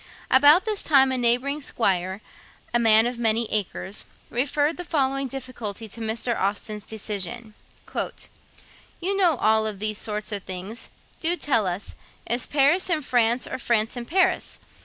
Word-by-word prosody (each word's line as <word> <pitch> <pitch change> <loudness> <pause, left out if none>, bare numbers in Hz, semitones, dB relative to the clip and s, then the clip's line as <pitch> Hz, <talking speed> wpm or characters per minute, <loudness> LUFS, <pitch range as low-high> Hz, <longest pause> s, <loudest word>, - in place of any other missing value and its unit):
About 290 - +7
this 425 -2 -2
time, 270 -3 +4
a - - 0
neighbouring 250 +5 +1
squire, 190 -6 0 0.5
a 240 - +3
man 225 -1 +5
of 240 0 -3
many 230 0 +1
acres, 205 -1 -2 0.3
referred 290 +5 0
the 355 - -4
following 275 -4 0
difficulty 240 -5 -6
to 230 - -7
Mr. 225 +2 -1
Austen's 205 +1 -2
decision: 215 +1 -5 1.5
'You 380 +3 0
know 360 -5 +4
all 220 -2 +2
about 210 -2 -5
these 215 +1 0
sort 210 0 -3
of 205 -1 0
things. 190 +5 -6 0.3
Do 340 +2 +2
tell 230 - +1
us. 180 +3 -4 0.3
Is 240 +1 0
Paris 300 +7 +3
in 315 -4 +1
France, 240 -1 +2
or - - -5
France 225 -2 +1
in 240 -1 -5
Paris? 370 +6 +1
235 Hz, 155 wpm, -24 LUFS, 215-275 Hz, 1.5 s, About